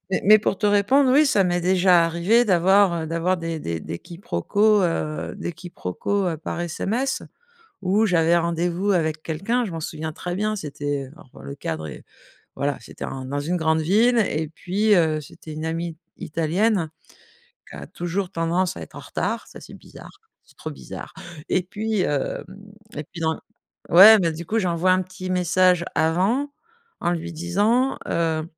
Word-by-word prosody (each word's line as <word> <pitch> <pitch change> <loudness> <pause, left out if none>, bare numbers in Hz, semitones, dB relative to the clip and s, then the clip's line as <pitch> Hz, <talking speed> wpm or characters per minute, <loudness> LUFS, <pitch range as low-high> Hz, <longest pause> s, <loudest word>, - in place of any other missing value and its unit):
mais 190 - 0
mais 215 +2 +8
pour 200 - -1
te 210 - +1
répondre, 255 +7 +4
oui, 300 +2 +5
ça 200 -7 +3
m'est 175 0 0
déjà 180 -1 +4
arrivé 175 +9 +2
d'avoir, 185 -2 +3
heu, - - -4
d'avoir 170 +3 0
des 165 -1 -4
des 85 - -4
des 85 - -6
quiproquos, 200 - +1
heu, 165 -2 -2
des 175 -3 -4
quiproquos, 180 - -3
heu, 160 - -2
par 165 +2 -5
SMS, 225 +10 -2 0.6
où 200 +4 +2
j'avais 170 -2 +3
rendez-vous 170 +3 0
avec 155 -3 0
quelqu'un. 195 +10 -1
Je 205 - -5
m'en 165 - -5
souviens 155 0 -5
très 175 +2 -5
bien 215 +2 -1
c'était 145 -4 -4
heu, 130 - -13
alors 125 - -16
le 70 - -6
cadre 80 +1 -5
est 70 - -10 0.5
voilà, 140 0 -1
c'était - - -10
un 130 -1 -6
dans 145 +2 -3
une 175 +5 -1
grande 160 -1 +1
ville 225 +9 +3
et 160 -6 0
puis, 200 +6 +1
heu, 160 -3 +2
c'était 155 +2 -12
une 155 +1 -5
amie 165 0 -3 0.2
italienne 170 +2 0 0.8
qui - - -10
a - - -9
toujours 175 +2 -3
tendance 170 +2 -1
à - - -8
être - - -11
en - - -7
retard. - - -3
Ça, - - -12
c'est - - -13
bizarre, 405 - -14 0.3
c'est - - -24
trop - - -6
bizarre - - -9 0.4
et 185 - +2
puis, 215 +2 -2
hem, 145 -5 -1 0.5
et 150 - -4
puis 165 +3 -11
dans 160 0 0 0.5
ouais, 205 +6 +10
mais 165 -3 +1
du 165 +2 -7
coup, 225 +6 0
j'envoie 180 -1 +1
un 185 - +3
petit 185 0 -8
message 180 0 +3
avant 190 - +1 0.5
en 175 - +1
lui 170 0 -4
disant: 205 +10 +1
«Heu, 160 -2 0
175 Hz, 180 wpm, -23 LUFS, 160-200 Hz, 0.8 s, ouais